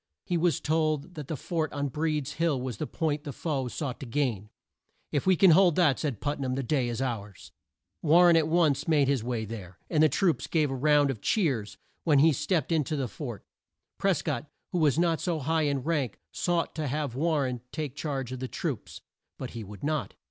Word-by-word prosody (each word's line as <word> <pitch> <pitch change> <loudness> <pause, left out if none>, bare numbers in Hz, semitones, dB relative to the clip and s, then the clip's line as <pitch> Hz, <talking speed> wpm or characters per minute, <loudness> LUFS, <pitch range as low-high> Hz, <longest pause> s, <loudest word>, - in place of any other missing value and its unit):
He 175 - -1
was 170 -4 +2
told 155 +1 0
that 150 -5 -7
the 155 - -3
fort 160 +2 -2
on 145 -1 -1
Breed's 150 0 -1
Hill 165 -5 +1
was 125 -4 -4
the 155 - -3
point 155 -3 -1
the 145 - -5
foe 135 -3 -2
sought 130 +1 -4
to 135 - -7
gain. 115 -6 -1 0.6
"If 145 +2 -1
we 190 - +6
can 185 +1 +6
hold 175 -1 +5
that," 160 -7 +3
said 140 -9 -2
Put 145 0 -2
nam, 130 -2 -1
"the 135 - -2
day 130 -2 0
is 120 +2 -2
ours." 105 -6 -5 0.5
War 170 +3 +6
ren 170 -1 +7
at 160 -2 +3
once 160 -3 +2
made 150 -4 +3
his 135 -5 +1
way 120 -2 -2
there, 95 -4 -8
and 155 -3 +3
the 155 - +6
troops 160 - +1
gave 155 -4 +1
a - - -2
round 145 +1 +3
of 110 -6 -7
cheers 135 - 0 0.3
when 150 -4 +4
he 155 +3 +6
stepped 170 +5 0
in 160 -2 +3
to 155 - -2
the 135 -3 -1
fort. 120 -4 -7 0.5
Pres - - +1
cott, - - -3 0.2
who 180 - 0
was 150 -3 +3
not 170 -1 +2
so 175 -3 0
high 155 +2 +1
in 140 -2 -1
rank, 145 -8 -1
sought 175 -1 0
to 155 -2 -3
have 145 -1 -2
War 155 +2 +1
ren 125 -2 -3
take 150 -4 -4
charge 140 -4 -3
of 130 - -5
the 130 - -3
troops. - - -5 0.4
But - - -6
he 115 - -6
would 100 -1 -11
not. 155 0 -2
145 Hz, 220 wpm, -28 LUFS, 130-160 Hz, 0.6 s, ren